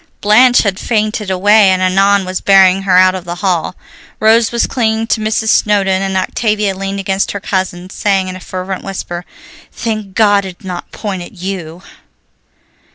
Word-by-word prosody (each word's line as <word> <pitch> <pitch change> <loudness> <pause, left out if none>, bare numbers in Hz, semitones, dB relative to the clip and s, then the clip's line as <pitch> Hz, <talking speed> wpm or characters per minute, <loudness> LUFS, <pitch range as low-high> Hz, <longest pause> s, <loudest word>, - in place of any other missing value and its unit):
Blanche 245 +4 +5
had 200 -3 -2
fainted 215 -2 -1
away 205 +2 +4
and 185 0 +2
Annon 195 +1 +2
was 185 0 -4
bearing 195 -1 +4
her 190 -2 +2
out 185 0 +5
of 185 -2 -6
the 175 0 -6
hall. 180 -1 -1 0.4
Rose 225 +1 +3
was 235 0 +1
clinging 225 -3 -1
to 225 -1 -1
Mrs. 220 +1 -1
Snowdon, 195 -3 +2
and 195 -1 -1
Octavia 210 0 -1
leaned 195 +1 -4
against 195 0 -1
her 200 - -4
cousin, 185 -2 -3
saying 195 -3 0
in 185 - -6
a - - -8
fervent 185 +1 -6
whisper, 180 -2 -6 0.5
"Thank 215 -4 -5
God 205 -2 +3
it 185 -2 -8
did - - -18
not 180 -1 -7
point 195 -4 -5
at 175 - -10
you!" 180 -2 -7
195 Hz, 175 wpm, -14 LUFS, 185-210 Hz, 0.5 s, Blanche